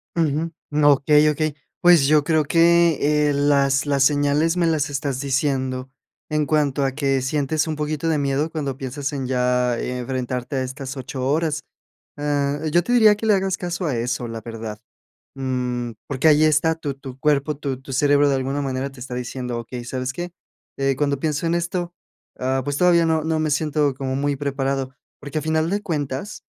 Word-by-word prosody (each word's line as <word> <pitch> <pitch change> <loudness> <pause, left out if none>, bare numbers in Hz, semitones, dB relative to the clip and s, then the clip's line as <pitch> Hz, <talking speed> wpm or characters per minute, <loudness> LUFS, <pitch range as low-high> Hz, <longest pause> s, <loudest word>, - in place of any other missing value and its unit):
Ujú, 165 0 0 0.4
okey, 150 +2 +4
okey. 150 0 -1 0.3
Pues, 175 -5 +6
yo 150 0 +4
creo 155 -1 +2
que, 165 -2 +3
eh, - - +1
las 140 -1 +2
las 140 -2 +2
señales 145 +4 +2
me 170 -2 +2
las 155 -3 +1
estás 140 -2 -2
diciendo. 130 -2 -1 0.4
En 150 0 +1
cuanto 145 -2 +1
a 135 - +1
que 135 -1 0
sientes 145 +3 0
un 155 - -2
poquito 150 +1 -2
de 155 - +2
miedo 140 +2 0
cuando 140 -5 -4
piensas 140 +2 -4
en 135 -2 -3
ya 125 -1 +1
enfrentarte 125 +1 -3
a 130 - 0
estas 135 +1 -6
8 130 0 -4
horas. 150 +1 0 0.6
Ah, 145 -1 0
yo 175 +2 +3
te 240 - -3
diría 220 -3 +6
que 210 - -5
le 215 - +5
hagas 190 -1 0
caso 175 0 -3
a 145 -6 0
eso, 120 +1 -2
la 115 -1 -6
verdad. 110 -1 -7 0.6
Mm, 125 -2 -2 0.2
porque 140 +2 +2
ahí 155 0 +5
está 155 +1 +3
tu 145 -4 -4
tu 135 -1 -10
cuerpo, 150 +1 +1
tu 135 -3 -4
tu 135 0 -10
cerebro 145 +2 +4
de 140 - +2
alguna 135 +2 -2
manera 135 0 -2
te 135 -2 -14
está 125 0 -6
diciendo: 125 0 -4
"Okey, 120 +1 -7
¿sabes 130 +1 -3
qué? 175 +3 -6 0.5
Eh, 135 0 +1
cuando 140 -1 0
pienso 155 +1 -1
en 165 - +1
esto, 175 0 -3 0.4
ah, 130 +1 0
pues 145 +1 -2
todavía 170 -2 +4
no 160 -1 +1
no 160 -1 0
me 155 -1 0
siento 150 -1 +1
como 130 0 -3
muy 140 0 0
preparado". 135 -1 -2 0.3
Porque 145 +1 -4
a 150 - -4
final 160 +1 0
de 205 +1 -1
cuentas, 145 0 -4
145 Hz, 190 wpm, -22 LUFS, 130-155 Hz, 0.6 s, Pues